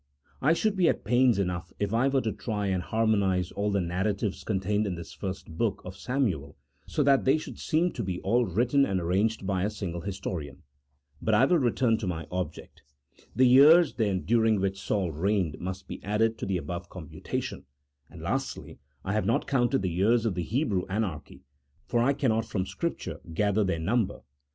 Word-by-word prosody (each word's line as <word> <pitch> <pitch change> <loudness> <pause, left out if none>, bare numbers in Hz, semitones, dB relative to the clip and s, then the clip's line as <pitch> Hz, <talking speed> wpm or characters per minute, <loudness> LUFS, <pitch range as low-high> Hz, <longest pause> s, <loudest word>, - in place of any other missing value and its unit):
I 150 +4 +4
should 210 +4 0
be 180 -3 +4
at - - -1
pains 120 +1 +3
enough 90 -2 -2
if 100 +1 -2
I 120 +4 +3
were 135 -1 +2
to 110 - -1
try 105 -3 -3
and 95 -2 0
harmo 110 +1 +1
nize 90 -2 0
all 105 +1 -1
the 100 -1 +1
narratives 95 +4 -2
contained 105 +1 0
in 95 - -2
this 85 -1 -9
first 95 -4 -6
book 115 -4 0
of 90 +1 -7
Samuel 100 - -2 0.3
so 150 - 0
that 140 -1 +4
they 135 +3 +4
should 155 - -8
seem 170 +3 +1
to - - -5
be 90 -2 -3
all 120 +5 +2
written 125 - +2
and 95 -8 0
arranged 95 +5 0
by 95 -1 0
a 100 - +1
single 95 -5 -5
historian. 90 -6 -5 0.6
But 110 - +2
I 110 - +5
return 125 -6 +2
to 105 - -4
my 80 -3 -3
object. 90 0 -5 0.5
The 130 - +5
years, 145 +6 +7
then, 100 -5 0
during 110 -1 +2
which 95 0 -2
Saul 95 -4 -1
reigned 90 0 0
must 95 +1 -6
be - - -8
added 110 +3 +1
to - - -4
the 95 -1 0
above 85 0 -6
computation; 80 -4 -5 0.4
and, - - -11
lastly, - - -3 0.3
I 95 - -1
have 105 -3 0
not 115 - +1
counted 135 -2 +1
the 90 - 0
years 110 +7 +2
of 110 - +1
the 90 - -2
Hebrew 105 - 0
anarchy, 95 -12 -4 0.4
for 120 - 0
I 130 +4 +3
cannot 115 -5 +1
from 105 -4 -2
Scrip - - -3
ture - - -7 0.2
gather 105 +2 +2
their 95 -4 0
number. 100 +6 0
105 Hz, 195 wpm, -28 LUFS, 95-120 Hz, 0.6 s, years